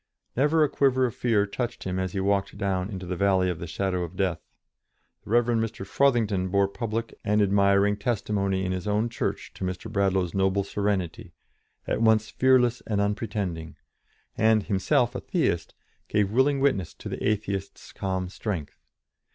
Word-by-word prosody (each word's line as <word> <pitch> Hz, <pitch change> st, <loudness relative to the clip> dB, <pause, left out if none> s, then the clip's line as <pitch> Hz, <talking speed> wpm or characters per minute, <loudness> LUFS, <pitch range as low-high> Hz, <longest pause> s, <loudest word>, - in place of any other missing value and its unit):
Never 150 Hz, +5 st, +3 dB
a -, -, +4 dB
quiver 130 Hz, -2 st, +2 dB
of 120 Hz, -, -2 dB
fear 110 Hz, -4 st, +2 dB
touched 120 Hz, +4 st, -4 dB
him 95 Hz, 0 st, -2 dB
as 95 Hz, -1 st, -2 dB
he 100 Hz, -, -1 dB
walked 100 Hz, 0 st, 0 dB
down 95 Hz, -2 st, -1 dB
into 95 Hz, -3 st, -6 dB
the 90 Hz, +1 st, -3 dB
valley 95 Hz, -1 st, +2 dB
of 85 Hz, -, -6 dB
the 85 Hz, -, -6 dB
shadow 95 Hz, +1 st, -1 dB
of 85 Hz, +1 st, -7 dB
death; 90 Hz, -4 st, -1 dB, 0.8 s
the -, -, -14 dB
Rev. 120 Hz, +2 st, +4 dB
Mr. 115 Hz, -4 st, -1 dB
Frothingham 105 Hz, -6 st, +2 dB
bore 100 Hz, +1 st, +3 dB
public 115 Hz, +2 st, -4 dB
and 105 Hz, +1 st, +2 dB
admiring 100 Hz, 0 st, +3 dB
testimony 100 Hz, -3 st, -1 dB
in 90 Hz, -, -1 dB
his 95 Hz, +1 st, -3 dB
own 105 Hz, +3 st, +1 dB
church 120 Hz, -, -3 dB
to -, -, -7 dB
Mr. 90 Hz, -1 st, -4 dB
Bradlaugh's 95 Hz, -3 st, +1 dB
noble 95 Hz, 0 st, +2 dB
serenity, 100 Hz, -1 st, -2 dB, 0.5 s
at -, -, -1 dB
once 110 Hz, -1 st, +3 dB
fearless 125 Hz, -2 st, +3 dB
and 105 Hz, -2 st, 0 dB
unpretending, 100 Hz, -5 st, -2 dB, 0.6 s
and, 110 Hz, -1 st, +3 dB
himself 110 Hz, +5 st, +1 dB
a 125 Hz, -, -3 dB
Theist, 85 Hz, -, -1 dB, 0.3 s
gave 100 Hz, -1 st, +1 dB
willing 135 Hz, +4 st, +3 dB
witness 130 Hz, -, +1 dB
to -, -, -9 dB
the -, -, -5 dB
Atheist's 100 Hz, -2 st, -2 dB
calm 95 Hz, -1 st, -2 dB
strength. 90 Hz, -5 st, -5 dB
100 Hz, 170 wpm, -26 LUFS, 95-115 Hz, 0.8 s, a